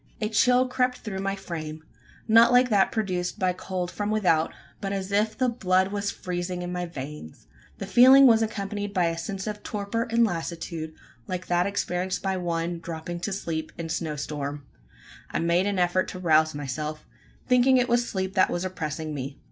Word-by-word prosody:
A 215 Hz, -, -1 dB
chill 250 Hz, +3 st, +4 dB
crept 250 Hz, 0 st, 0 dB
through 195 Hz, -4 st, -5 dB
my 195 Hz, 0 st, -1 dB
frame 155 Hz, -5 st, -6 dB, 0.4 s
not 230 Hz, +2 st, +7 dB
like 250 Hz, 0 st, +5 dB
that 200 Hz, -2 st, +4 dB
produced 185 Hz, -5 st, -2 dB
by 185 Hz, -3 st, +1 dB
cold 180 Hz, -1 st, -4 dB
from 205 Hz, 0 st, -3 dB
without; 180 Hz, -7 st, +2 dB, 0.3 s
but 195 Hz, -, -3 dB
as 195 Hz, 0 st, -3 dB
if 210 Hz, +2 st, +1 dB
the 255 Hz, -, +2 dB
blood 190 Hz, -5 st, +1 dB
was 205 Hz, 0 st, -1 dB
freezing 180 Hz, -1 st, -4 dB
in 175 Hz, -, -4 dB
my 180 Hz, 0 st, -3 dB
veins! 140 Hz, -, -8 dB, 0.3 s
The -, -, -5 dB
feeling 255 Hz, +7 st, +8 dB
was 225 Hz, -3 st, +6 dB
accompanied 205 Hz, -1 st, -3 dB
by 180 Hz, -2 st, +3 dB
a 165 Hz, -, -3 dB
sense 195 Hz, +3 st, -5 dB
of 210 Hz, -1 st, -5 dB
torpor 215 Hz, +3 st, -3 dB
and 230 Hz, 0 st, +4 dB
lassitude 165 Hz, -3 st, -4 dB, 0.3 s
like 180 Hz, 0 st, -4 dB
that 175 Hz, +1 st, +1 dB
experienced 185 Hz, -2 st, -2 dB
by 190 Hz, -1 st, 0 dB
one 170 Hz, -1 st, -2 dB
dropping 165 Hz, +1 st, -6 dB
to 200 Hz, -, -3 dB
sleep 165 Hz, -5 st, -3 dB
in 170 Hz, -, -4 dB
a -, -, -6 dB
snow 160 Hz, -1 st, -2 dB
storm. 145 Hz, -1 st, -5 dB, 0.6 s
I -, -, -2 dB
made 170 Hz, +3 st, +2 dB
an 200 Hz, -1 st, -1 dB
effort 180 Hz, +1 st, +2 dB
to 185 Hz, -, -7 dB
rouse 155 Hz, -3 st, +3 dB
myself 150 Hz, +2 st, -4 dB, 0.4 s
thinking 255 Hz, +1 st, +5 dB
it 250 Hz, 0 st, +2 dB
was 240 Hz, 0 st, +1 dB
sleep 190 Hz, -1 st, -2 dB
that 190 Hz, -, +4 dB
was 175 Hz, +2 st, -2 dB
oppressing 155 Hz, -3 st, -4 dB
me. 135 Hz, 0 st, -5 dB
185 Hz, 190 wpm, -26 LUFS, 165-210 Hz, 0.6 s, feeling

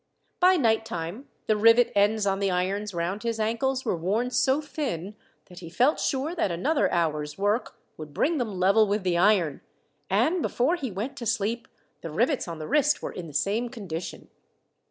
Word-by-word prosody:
By 370 Hz, +1 st, +5 dB
nighttime 225 Hz, -, -1 dB, 0.2 s
the 215 Hz, -, +2 dB
rivet 230 Hz, +3 st, +5 dB
ends 205 Hz, +1 st, +3 dB
on 195 Hz, -1 st, 0 dB
the 200 Hz, -1 st, +1 dB
irons 195 Hz, +3 st, -1 dB
round 175 Hz, +3 st, -3 dB
his 230 Hz, -1 st, -2 dB
ankles 255 Hz, +4 st, -1 dB
were -, -, 0 dB
worn 205 Hz, +9 st, -1 dB
so 260 Hz, +3 st, +2 dB
thin, 215 Hz, -, -4 dB, 0.3 s
that 180 Hz, -1 st, -13 dB
he 170 Hz, -2 st, -9 dB
felt 250 Hz, -, +2 dB
sure 275 Hz, +5 st, -1 dB
that 320 Hz, -, 0 dB
another 275 Hz, -, 0 dB
hour's 150 Hz, -3 st, -1 dB
work 205 Hz, +4 st, -1 dB, 0.2 s
would 155 Hz, -1 st, -9 dB
bring 305 Hz, -, 0 dB
them 215 Hz, -6 st, -3 dB
level 200 Hz, +4 st, +4 dB
with 205 Hz, 0 st, -1 dB
the 175 Hz, -2 st, +1 dB
iron, 180 Hz, -7 st, +2 dB, 0.5 s
and 340 Hz, +2 st, +2 dB
before 275 Hz, +6 st, +1 dB
he 275 Hz, -7 st, -4 dB
went 225 Hz, +8 st, -5 dB
to 235 Hz, -3 st, -5 dB
sleep 230 Hz, +1 st, -1 dB, 0.3 s
the -, -, -6 dB
rivets 285 Hz, -, 0 dB
on 170 Hz, -1 st, -6 dB
the 155 Hz, -, -6 dB
wrist 295 Hz, +1 st, +2 dB
were -, -, -3 dB
in 175 Hz, -2 st, -7 dB
the 150 Hz, -, -11 dB
same 215 Hz, +9 st, 0 dB
condition. 185 Hz, -9 st, -7 dB
215 Hz, 185 wpm, -26 LUFS, 180-250 Hz, 0.5 s, By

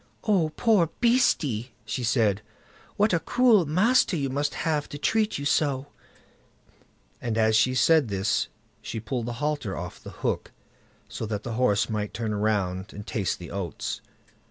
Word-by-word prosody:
"Oh, 190 Hz, -7 st, +2 dB
poor 210 Hz, -9 st, +3 dB
beastie", 145 Hz, -, +2 dB
she 110 Hz, +4 st, -3 dB
said, 110 Hz, -3 st, +2 dB, 0.6 s
"what 210 Hz, -1 st, +3 dB
a 170 Hz, -, +3 dB
cruel 230 Hz, -, +4 dB
master 195 Hz, -, +3 dB
you 135 Hz, -3 st, -1 dB
must 145 Hz, +2 st, -1 dB
have 155 Hz, -3 st, -1 dB
to 145 Hz, -, -6 dB
treat 215 Hz, +8 st, +1 dB
you 140 Hz, -, -5 dB
so", 145 Hz, -1 st, +1 dB, 1.3 s
and 115 Hz, -2 st, -2 dB
as 110 Hz, 0 st, +3 dB
she 130 Hz, +4 st, +3 dB
said 160 Hz, 0 st, +4 dB
this 100 Hz, 0 st, 0 dB, 0.3 s
she 110 Hz, -, -5 dB
pulled 115 Hz, +2 st, -3 dB
the 120 Hz, -, -3 dB
halter 145 Hz, -6 st, -2 dB
off 90 Hz, +1 st, -7 dB
the -, -, -9 dB, 0.2 s
hook, -, -, -1 dB, 0.6 s
so 110 Hz, -, -5 dB
that 105 Hz, -1 st, -3 dB
the 120 Hz, -, -4 dB
horse 110 Hz, -4 st, +2 dB
might 105 Hz, -2 st, -3 dB
turn 110 Hz, -2 st, -2 dB
round 100 Hz, -2 st, -1 dB
and 105 Hz, +1 st, -8 dB
taste 105 Hz, -6 st, -1 dB
the 85 Hz, -, -9 dB
oats. 95 Hz, -6 st, -4 dB
125 Hz, 160 wpm, -26 LUFS, 105-160 Hz, 1.3 s, cruel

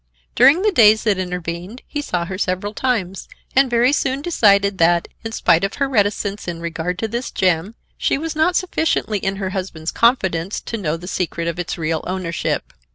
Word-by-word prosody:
During 275 Hz, -, +5 dB
the 425 Hz, -, +3 dB
days 220 Hz, -, +5 dB
that 210 Hz, -4 st, +1 dB
intervened 180 Hz, +4 st, -5 dB
he 295 Hz, -, -4 dB
saw 175 Hz, -11 st, -2 dB
her 185 Hz, +1 st, -6 dB
several 190 Hz, +2 st, -2 dB
times 200 Hz, -8 st, -2 dB, 0.3 s
and 270 Hz, 0 st, +4 dB
very 240 Hz, +3 st, +3 dB
soon 275 Hz, -1 st, 0 dB
decided 200 Hz, -, +3 dB
that, 170 Hz, +1 st, +3 dB, 0.2 s
in 225 Hz, -, -5 dB
spite 170 Hz, -6 st, +2 dB
of 195 Hz, -, -1 dB
her 275 Hz, -, 0 dB
reticence 205 Hz, -4 st, 0 dB
in 170 Hz, -1 st, -4 dB
regard 170 Hz, +1 st, -3 dB
to 225 Hz, -, -2 dB
this 235 Hz, +3 st, -4 dB
gem, 185 Hz, +3 st, 0 dB, 0.2 s
she -, -, +1 dB
was 320 Hz, +2 st, -4 dB
not 320 Hz, +3 st, +2 dB
sufficiently 320 Hz, -, 0 dB
in 195 Hz, +1 st, -2 dB
her 190 Hz, -1 st, -3 dB
husband's 180 Hz, -4 st, -4 dB
confidence 190 Hz, -7 st, +1 dB
to 230 Hz, -, -5 dB
know 165 Hz, -6 st, -2 dB
the 175 Hz, +2 st, -10 dB
secret 170 Hz, -2 st, -2 dB
of 170 Hz, +1 st, -3 dB
its 175 Hz, -, -3 dB
real 160 Hz, -1 st, -2 dB
ownership. 180 Hz, -2 st, -3 dB
195 Hz, 190 wpm, -20 LUFS, 175-240 Hz, 0.3 s, During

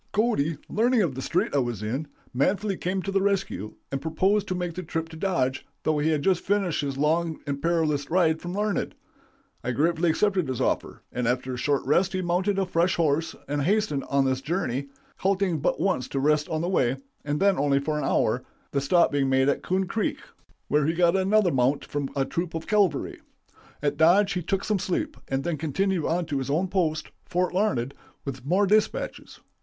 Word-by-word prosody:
Cody, 205 Hz, -9 st, +1 dB
learning 235 Hz, +1 st, +2 dB
of 160 Hz, -7 st, -1 dB
the 130 Hz, -, -5 dB
strait -, -, 0 dB
I 145 Hz, -, +3 dB
was 120 Hz, -5 st, -2 dB
in, 130 Hz, +8 st, -2 dB, 0.3 s
manfully 195 Hz, +10 st, +1 dB
came 185 Hz, +1 st, -2 dB
to 195 Hz, -, -3 dB
the 195 Hz, 0 st, +2 dB
rescue, 195 Hz, -, -1 dB, 0.2 s
and 135 Hz, 0 st, -2 dB
proposed 190 Hz, +6 st, +1 dB
to 185 Hz, -, -1 dB
make 175 Hz, -1 st, -3 dB
the 185 Hz, -, -5 dB
trip 165 Hz, -1 st, -4 dB
to 160 Hz, -, -10 dB
Dodge, 160 Hz, -8 st, 0 dB, 0.2 s
though 155 Hz, -1 st, +1 dB
he 150 Hz, +2 st, +2 dB
had 150 Hz, -3 st, +1 dB
just 185 Hz, 0 st, +2 dB
finished 195 Hz, -6 st, +1 dB
his 140 Hz, -2 st, -3 dB
long 160 Hz, +3 st, +1 dB
and 140 Hz, -1 st, -3 dB
perilous 155 Hz, -4 st, +1 dB
ride 160 Hz, -2 st, +2 dB
from 175 Hz, 0 st, -5 dB
Larned. 210 Hz, -1 st, -1 dB, 0.7 s
I -, -, -2 dB
gratefully 165 Hz, +5 st, +2 dB
accepted 190 Hz, 0 st, +1 dB
his 130 Hz, -2 st, -3 dB
offer, -, -, -1 dB
and 125 Hz, -1 st, -2 dB
after 125 Hz, +1 st, -1 dB
a -, -, -4 dB
short 140 Hz, +2 st, 0 dB
rest 185 Hz, +2 st, +2 dB
he 185 Hz, 0 st, -1 dB
mounted 185 Hz, +3 st, +1 dB
a 195 Hz, -, +2 dB
fresh 175 Hz, 0 st, +1 dB
horse 160 Hz, 0 st, +1 dB
and 145 Hz, 0 st, -1 dB
hastened 185 Hz, -4 st, +1 dB
on 140 Hz, -1 st, +2 dB
his 130 Hz, 0 st, 0 dB
journey, 140 Hz, -5 st, -2 dB, 0.3 s
halting 190 Hz, -4 st, +1 dB
but -, -, 0 dB
once 180 Hz, -10 st, 0 dB
to 135 Hz, -, -2 dB
rest 150 Hz, +2 st, +2 dB
on 160 Hz, 0 st, -1 dB
the 170 Hz, -, -1 dB
way, 135 Hz, -8 st, +1 dB, 0.3 s
and 145 Hz, 0 st, -1 dB
then 195 Hz, 0 st, +3 dB
only 140 Hz, -1 st, +3 dB
for 150 Hz, +2 st, -1 dB
an -, -, -3 dB
hour, -, -, +1 dB, 0.3 s
the 140 Hz, -, 0 dB
stop 170 Hz, +5 st, +3 dB
being 140 Hz, -2 st, +1 dB
made 130 Hz, +1 st, +3 dB
at -, -, 0 dB
Coon 190 Hz, +1 st, 0 dB
Creek, 210 Hz, +3 st, -1 dB, 0.5 s
where 150 Hz, 0 st, +2 dB
he 165 Hz, -, +2 dB
got 175 Hz, +1 st, +3 dB
another 195 Hz, 0 st, +3 dB
mount 130 Hz, +1 st, +1 dB
from 145 Hz, -2 st, -3 dB
a 135 Hz, -1 st, +1 dB
troop 170 Hz, +2 st, -3 dB
of 165 Hz, -, -4 dB
cavalry. 200 Hz, -9 st, +1 dB, 0.6 s
At 145 Hz, 0 st, 0 dB
Dodge 190 Hz, +6 st, +5 dB
he 180 Hz, -, -1 dB
took 195 Hz, +3 st, -1 dB
some 210 Hz, -2 st, 0 dB
sleep, 290 Hz, -, -2 dB
and 135 Hz, 0 st, -1 dB
then 170 Hz, -3 st, -1 dB
continued 170 Hz, +3 st, 0 dB
on 175 Hz, +1 st, 0 dB
to 145 Hz, -3 st, -2 dB
his 135 Hz, -, -4 dB
own 170 Hz, +6 st, +1 dB
post 160 Hz, -5 st, -1 dB
Fort 180 Hz, 0 st, -1 dB
Larned 140 Hz, -, 0 dB, 0.3 s
with 135 Hz, -2 st, -5 dB
more 185 Hz, +8 st, +2 dB
dispatches. 215 Hz, -, 0 dB
165 Hz, 210 wpm, -26 LUFS, 140-190 Hz, 0.7 s, Dodge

